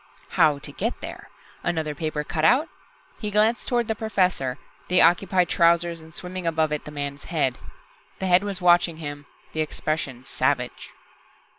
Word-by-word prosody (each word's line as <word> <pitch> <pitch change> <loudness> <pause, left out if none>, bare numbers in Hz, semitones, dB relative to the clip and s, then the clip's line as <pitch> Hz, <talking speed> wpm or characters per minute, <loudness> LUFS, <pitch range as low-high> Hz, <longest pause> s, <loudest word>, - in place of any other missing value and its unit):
How 150 -2 +4
to 145 +1 -7
get 225 +11 -3
there? - - -8 0.3
Another 160 -3 -1
paper 150 0 -3
cutout? 175 - +3 0.5
He 210 - -3
glanced 215 +3 +2
toward 240 -2 +1
the 220 - +1
Professor 185 - 0 0.3
the 180 0 +3
occupied 180 0 +4
trousers, 170 0 +3
and 160 +1 -15
swimming 180 -1 -5
above 160 -1 +1
it, 150 - -3
the 150 - -8
man's 145 -1 -5
head. 135 -7 0 0.6
The 190 - -3
head 180 +1 +5
was 200 -2 -2
watching 175 -2 +4
him, 145 -2 -7 0.3
the 155 - -1
expression 150 -4 -3
savage. 130 -2 -1
165 Hz, 155 wpm, -24 LUFS, 150-185 Hz, 0.6 s, head